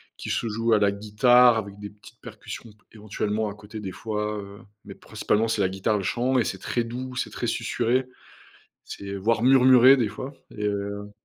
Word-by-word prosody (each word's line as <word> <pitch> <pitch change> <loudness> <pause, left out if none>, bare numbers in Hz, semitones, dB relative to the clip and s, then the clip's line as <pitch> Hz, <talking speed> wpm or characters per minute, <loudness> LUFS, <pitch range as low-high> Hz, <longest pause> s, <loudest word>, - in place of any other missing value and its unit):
qui - - -8
se 115 - -1
joue 115 +1 -1
à 110 - +5
la 100 -1 +2
guitare 120 +4 +4
avec 100 -2 -5
des 105 0 -8
petites 105 0 -18
percussions 115 - -9
p 105 - -24 0.2
éventuellement 105 0 -3
à - - -7
côté, 105 +1 -10
des 95 -2 -5
fois, 105 +1 -4
heu, 100 0 -11 0.3
mais, - - -10
principalement, 110 +2 -1
c'est 110 - -1
la 95 - +3
guitare, 95 +3 -1
le 100 - -4
chant 125 +5 +1
et 120 - +1
c'est 95 - -3
très 115 +5 -2
doux, 125 +2 -6
c'est - - -3
très - - -4
susurré, 125 +3 0 0.8
c'est 100 0 -8
voire 110 +3 0
murmuré 130 0 +7
des 120 -5 0
fois 130 +7 -7 0.2
et 105 - -3
heu 100 0 -3
110 Hz, 205 wpm, -25 LUFS, 100-120 Hz, 0.8 s, murmuré